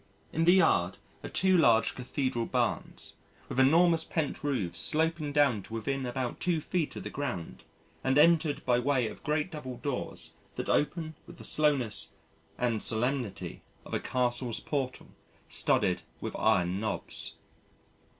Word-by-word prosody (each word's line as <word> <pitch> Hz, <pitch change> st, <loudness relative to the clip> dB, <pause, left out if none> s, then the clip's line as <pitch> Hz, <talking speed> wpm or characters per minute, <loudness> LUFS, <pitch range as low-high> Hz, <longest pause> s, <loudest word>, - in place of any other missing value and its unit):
In 165 Hz, +1 st, +1 dB
the 175 Hz, -, +7 dB
yard 160 Hz, -, +3 dB, 0.3 s
are -, -, -5 dB
two 190 Hz, 0 st, +3 dB
large 115 Hz, -9 st, +4 dB
Cathedral 125 Hz, -2 st, -2 dB
barns, -, -, -2 dB, 0.3 s
with -, -, -3 dB
enormous 165 Hz, +4 st, +5 dB
pent 160 Hz, -3 st, -2 dB
roofs 95 Hz, -, -1 dB
sloping 155 Hz, -, +1 dB
down 140 Hz, -7 st, +3 dB
to 105 Hz, -, -12 dB
within 130 Hz, +4 st, -2 dB
about 125 Hz, 0 st, -3 dB
two 175 Hz, -3 st, +1 dB
feet 165 Hz, 0 st, -2 dB
of -, -, -6 dB
the -, -, -6 dB
ground 125 Hz, -, -5 dB, 0.4 s
and 130 Hz, +1 st, +2 dB
entered 155 Hz, -1 st, +4 dB
by 125 Hz, -1 st, +3 dB
way 130 Hz, -2 st, +1 dB
of -, -, -9 dB
great 150 Hz, +4 st, 0 dB
double 130 Hz, -6 st, -6 dB
doors 125 Hz, +1 st, -5 dB, 0.2 s
that -, -, -4 dB
open 155 Hz, +2 st, 0 dB
with 170 Hz, -, -12 dB
the -, -, -11 dB
slowness 140 Hz, -8 st, 0 dB, 0.4 s
and 120 Hz, -3 st, 0 dB
solemnity 120 Hz, -1 st, -2 dB, 0.2 s
of -, -, -10 dB
a -, -, +1 dB
Castle's 125 Hz, -2 st, -1 dB
portal 135 Hz, -3 st, -3 dB, 0.4 s
studded 90 Hz, -1 st, +2 dB, 0.2 s
with -, -, -5 dB
iron 90 Hz, +1 st, +2 dB
knobs. 110 Hz, -1 st, -2 dB
135 Hz, 150 wpm, -30 LUFS, 120-155 Hz, 0.4 s, the